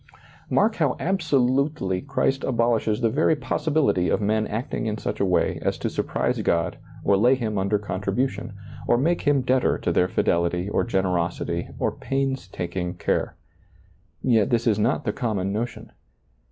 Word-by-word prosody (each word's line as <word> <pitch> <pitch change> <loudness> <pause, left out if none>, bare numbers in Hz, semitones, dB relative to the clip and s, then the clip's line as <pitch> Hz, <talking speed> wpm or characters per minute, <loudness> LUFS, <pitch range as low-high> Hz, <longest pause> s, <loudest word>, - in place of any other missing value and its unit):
Mark 215 +2 +2
how 145 -6 +1
absolutely 140 - +1
Christ 135 -1 0
abolishes 115 -2 +1
the 115 - +3
very 155 +4 +3
possibility 145 - +1
of - - +2
men 110 +1 +1
acting 115 +1 -3
in 105 0 -2
such - - -4
a 100 - +2
way 90 -2 +1
as - - -1
to - - -3
sur - - 0
prise - - -1
God 85 -1 0 0.2
or 100 - +4
lay 120 +7 +4
Him 110 -5 -2
under 100 +2 +1
contribution, 105 +3 -2 0.3
or 120 - +4
make 165 +7 +1
Him 145 -2 +2
debtor 130 0 +2
to - - -1
their 90 - +3
fidelity 85 0 0
or - - +1
generosity 90 -4 -1
or - - 0
pains 135 -4 -2
taking 90 0 -4
care. - - -1 0.9
Yet 115 -2 +3
this 120 -2 +1
is 110 -3 +2
not 120 +6 +1
the 105 - 0
com 115 -5 -2
mon 95 +1 -1
notion. 115 +3 -4
115 Hz, 165 wpm, -24 LUFS, 95-135 Hz, 0.9 s, or